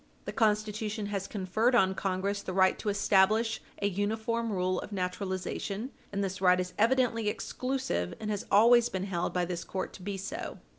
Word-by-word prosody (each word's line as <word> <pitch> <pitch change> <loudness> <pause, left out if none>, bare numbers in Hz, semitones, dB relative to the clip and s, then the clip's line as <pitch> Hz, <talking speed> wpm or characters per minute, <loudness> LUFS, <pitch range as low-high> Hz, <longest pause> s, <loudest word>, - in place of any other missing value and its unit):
The - - -3
Constitution 215 0 0
has 195 -1 -2
conferred 215 +5 +1
on 190 -5 +4
Congress 195 +1 -1
the 185 - -5
right 190 -1 +4
to 215 - -2
establish 205 +3 +3 0.2
an 200 -1 -1
uniform 220 +3 -1
rule 185 -1 0
of - - -8
naturalization, 195 +4 -3 0.2
and 200 0 -1
this 190 0 -3
right 180 -1 +5
is 180 0 -3
evidently 230 -1 +2
exclusive, 255 - -2
and 215 -1 -3
has 205 - -3
always 235 +3 +6
been 190 -3 -3
held 180 -3 -2
by 180 -1 0
this 175 -1 -4
court 190 - -4
to - - -11
be 200 +1 -4
so. 280 - -5
200 Hz, 180 wpm, -30 LUFS, 185-220 Hz, 0.2 s, always